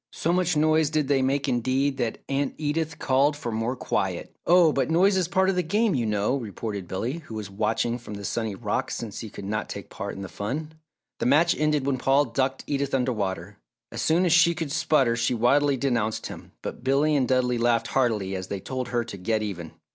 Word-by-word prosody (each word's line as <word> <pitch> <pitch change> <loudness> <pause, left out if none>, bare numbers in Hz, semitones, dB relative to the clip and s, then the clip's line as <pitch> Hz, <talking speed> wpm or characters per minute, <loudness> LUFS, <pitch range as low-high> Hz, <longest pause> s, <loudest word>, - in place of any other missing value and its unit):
So 170 - 0
much 180 -3 +1
noise 155 0 +3
did 155 -2 0
they 135 -2 +3
make 135 +2 0
indeed, 130 +3 +1
that 120 -4 -3
Aunt 140 0 -1
Edith 155 +1 -2
called 140 +3 +2
for 120 -5 -4
more 115 +3 -1
quiet. - - -2
"Oh, 170 -3 +6
but 135 - 0
noise 190 +5 +4
is 185 -3 +1
part 190 +2 +2
of 195 - +3
the 180 - +2
game, 205 +5 +1
you 120 -4 0
know!" 105 +4 +1
retorted 105 -4 -5
Billy, 120 - -3
who 130 -8 -10
was 105 -3 -6
watching 110 +4 0
from 105 -3 -8
the 100 0 -7
sunny 110 -2 -2
rocks - - -2
since 110 -4 -6
he 110 - -6
could 100 - -9
not 105 +1 -3
take 100 - -7
part 100 +1 -5
in 95 - -6
the - - -5
fun. 145 +12 -4 0.5
The - - 0
match 160 +6 +4
ended 150 -2 +1
when 135 -2 0
Paul 135 +3 +3
ducked 130 +2 -1
Edith 140 -1 -1
under 130 -1 +1
water. 100 -1 -4 0.3
As - - -4
soon 170 +3 +3
as 170 - +3
she 170 0 +5
could 160 -4 -4
sputter, 135 -6 +2
she 120 +1 0
wildly 140 +4 +3
denounced 120 -5 -1
him, - - -9
but - - -6
Billy 140 +3 +2
and 130 -3 +2
Dudley 125 -2 +1
laughed 115 -1 +2
heartily 110 -7 0
as 95 0 -5
they 100 - -4
told 130 +4 -4
her 120 -1 0
to 115 -4 -8
"get 110 +4 -1
even." 85 -6 -5
130 Hz, 225 wpm, -25 LUFS, 110-150 Hz, 0.5 s, Oh